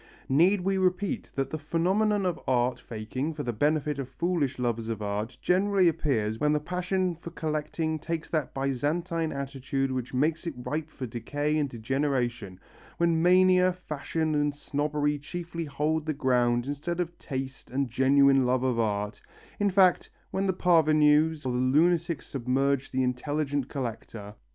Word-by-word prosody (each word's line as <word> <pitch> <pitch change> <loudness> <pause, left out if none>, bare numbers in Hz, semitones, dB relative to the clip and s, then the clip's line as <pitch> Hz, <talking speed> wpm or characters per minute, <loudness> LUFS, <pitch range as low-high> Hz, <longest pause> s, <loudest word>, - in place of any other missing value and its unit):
Need 175 +8 +4
we 190 +1 0
repeat 185 +1 0
that 135 -1 -2
the 155 - -3
phenomenon 190 +6 +1
of 180 -3 -1
art 125 -1 +1
faking 125 +7 -4
for 145 - -4
the 120 - -2
benefit 150 +3 0
of 135 -2 -4
foolish 150 -2 -1
lovers 115 -2 -2
of 115 -2 -3
art 105 +4 -3
generally 190 0 +3
appears 115 -9 0
when 150 0 +2
the 150 - +2
passion 180 +2 -1
for 170 +1 -9
collecting 155 0 -2
takes 165 +1 -4
that 155 -4 -1
Byzantine 155 +5 -1
attitude 135 -1 -2
which 130 -1 -3
makes 155 +6 0
it 165 - -4
ripe 150 +5 -4
for 135 - -6
decay 145 +6 -2
and 150 -2 0
degeneration, 120 -5 -2 0.4
when 170 -1 +2
mania, 185 +1 +5
fashion 160 -2 -3
and 145 -1 +1
snobbery 145 0 -1
chiefly 170 +3 -5
hold 150 +2 -1
the 155 - +1
ground 125 -3 +1
instead 150 +5 -3
of 175 -1 -2
taste 135 0 -6
and 135 +2 -1
genuine 135 +2 +4
love 125 0 +1
of 125 -3 +1
art, 105 0 -1 0.4
in 205 0 +3
fact 185 -2 +4 0.2
when 195 +1 0
the - - +3
parvenus 155 -3 +3
or 130 - 0
the 125 - 0
lunatic 165 +5 +2
submerge 135 +1 0
the 130 0 0
intelligent 140 +2 -1
collector. 115 -5 -6
145 Hz, 160 wpm, -28 LUFS, 130-165 Hz, 0.4 s, mania